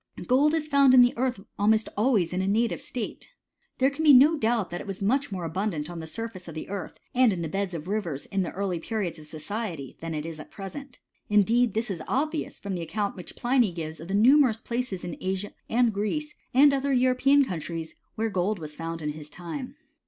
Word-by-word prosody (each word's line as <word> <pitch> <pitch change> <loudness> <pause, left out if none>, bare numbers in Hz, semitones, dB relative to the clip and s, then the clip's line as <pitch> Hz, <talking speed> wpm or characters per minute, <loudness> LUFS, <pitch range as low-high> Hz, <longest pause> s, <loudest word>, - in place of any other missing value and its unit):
* - - -51
Gold 285 +5 +4
is 310 -1 -1
found 280 -3 +6
in 250 - +9
the 245 - +3
earth 250 -3 -1 0.2
almost 215 +1 +3
always 210 -6 +2
in 185 - 0
a 190 - -1
native 225 +4 +1
state. 240 -4 -6 0.5
There 265 +1 +3
can 295 +3 -4
be 300 -2 +8
no 285 +5 +7
doubt 230 - 0
that 175 - -4
it - - -10
was 195 -1 -5
much 260 +6 +1
more 180 -3 -3
abundant 165 -2 -2
on 170 - -6
the 160 - -6
surface 225 0 -6
of 165 - -8
the 155 - -6
earth, 200 -1 -5 0.2
and 250 -2 +5
in 175 -3 -2
the - - -2
beds 195 +2 -2
of 160 +1 -6
rivers 185 -9 -2
in 195 - -1
the 180 - -2
early 190 -3 -2
periods 185 -3 -3
of 155 - -11
so 155 - -8
ciety, 170 - -5
than 165 -1 -4
it 150 0 -3
is 165 -2 -6
at - - -10
present: 250 +7 -8 0.3
indeed 220 +2 +3
this 225 -1 -1
is 170 -4 -4
obvious, 305 +3 -1
from 200 -1 -4
the 175 - -3
account 200 +5 -2
which 180 - -9
Pliny 240 -4 +2
gives 160 -2 -6
of 165 - -9
the 195 - -1
numerous 245 +1 +5
places 235 -6 -3
in 175 -2 -5
Asia 190 +2 -3 0.2
and 235 -1 +3
Greece, 300 +10 -2 0.2
and 280 +3 +6
other 275 0 0
European 260 +2 +4
coun 180 -8 -3
tries, 165 0 -6 0.2
where 225 0 -1
gold 195 +3 0
was 155 -3 -8
found 165 0 -5
in 150 - -1
his 150 0 -6
time. 215 - -7
205 Hz, 235 wpm, -27 LUFS, 170-250 Hz, 0.5 s, in